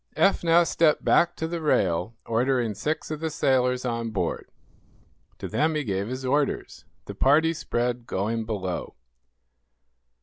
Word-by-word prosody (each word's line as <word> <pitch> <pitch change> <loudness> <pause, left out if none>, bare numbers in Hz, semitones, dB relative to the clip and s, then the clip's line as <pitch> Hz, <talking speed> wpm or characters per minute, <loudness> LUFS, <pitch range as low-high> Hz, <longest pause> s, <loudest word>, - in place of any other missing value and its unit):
Eph 195 - +3
now 170 +1 +5
stepped 165 -2 +2
back 175 0 +3
to 160 - -3
the 170 0 -4
rail, 95 - +1
ordering 120 -1 +1
six 150 +10 -3
of 155 - -3
the 160 0 -2
sailors 125 -3 +1
on 115 -1 -2
board. 95 -6 -3 0.9
To - - -6
them 155 +1 0
he 150 - 0
gave 100 -3 -2
his 130 +2 -5
orders. 140 +2 -1 0.2
The 100 - -7
party 150 +9 +3
spread, 120 -5 -2
going 110 +1 -2
below. 95 -5 -4
125 Hz, 145 wpm, -25 LUFS, 110-155 Hz, 0.9 s, now